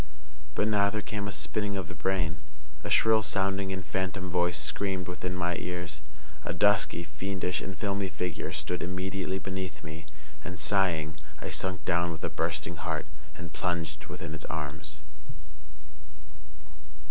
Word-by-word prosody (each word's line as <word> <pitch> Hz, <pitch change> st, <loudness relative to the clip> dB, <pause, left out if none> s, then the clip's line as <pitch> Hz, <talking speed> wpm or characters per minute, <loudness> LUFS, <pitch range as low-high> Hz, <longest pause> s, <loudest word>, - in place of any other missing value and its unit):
But 105 Hz, -, +3 dB
now 100 Hz, -2 st, +5 dB
there 105 Hz, 0 st, -2 dB
came 105 Hz, -1 st, -2 dB
a -, -, -1 dB
spinning 100 Hz, +5 st, 0 dB
of 95 Hz, -4 st, -2 dB
the -, -, -6 dB
brain; 90 Hz, -4 st, +1 dB, 0.5 s
a -, -, -2 dB
shrill 110 Hz, 0 st, +6 dB
sounding 95 Hz, -2 st, +1 dB
and 95 Hz, -2 st, -3 dB
phantom 95 Hz, -1 st, -1 dB
voice 90 Hz, 0 st, +3 dB
screamed 95 Hz, -3 st, 0 dB
within 90 Hz, 0 st, -2 dB
my 90 Hz, -1 st, +1 dB
ears; 90 Hz, -3 st, -3 dB, 0.4 s
a -, -, -1 dB
dusky, 100 Hz, -4 st, +5 dB
fiendish, 90 Hz, +3 st, -1 dB
and 95 Hz, -1 st, -4 dB
filmy 100 Hz, -1 st, 0 dB
figure 90 Hz, +1 st, -2 dB
stood 75 Hz, +4 st, -1 dB
immediately 95 Hz, +1 st, -1 dB
beneath 95 Hz, -4 st, -3 dB
me; 80 Hz, +1 st, -7 dB, 0.4 s
and, 90 Hz, 0 st, -5 dB
sighing, 85 Hz, -6 st, +3 dB, 0.2 s
I -, -, -4 dB
sunk 95 Hz, -1 st, +1 dB
down 85 Hz, -1 st, +3 dB
with 80 Hz, -, -6 dB
a -, -, +1 dB
bursting 80 Hz, 0 st, 0 dB
heart, 80 Hz, -2 st, -1 dB, 0.3 s
and 85 Hz, -1 st, -7 dB
plunged 80 Hz, -4 st, -1 dB
within 85 Hz, -3 st, -5 dB
its 75 Hz, -, -5 dB
arms. 75 Hz, 0 st, -4 dB
90 Hz, 150 wpm, -31 LUFS, 80-95 Hz, 0.5 s, shrill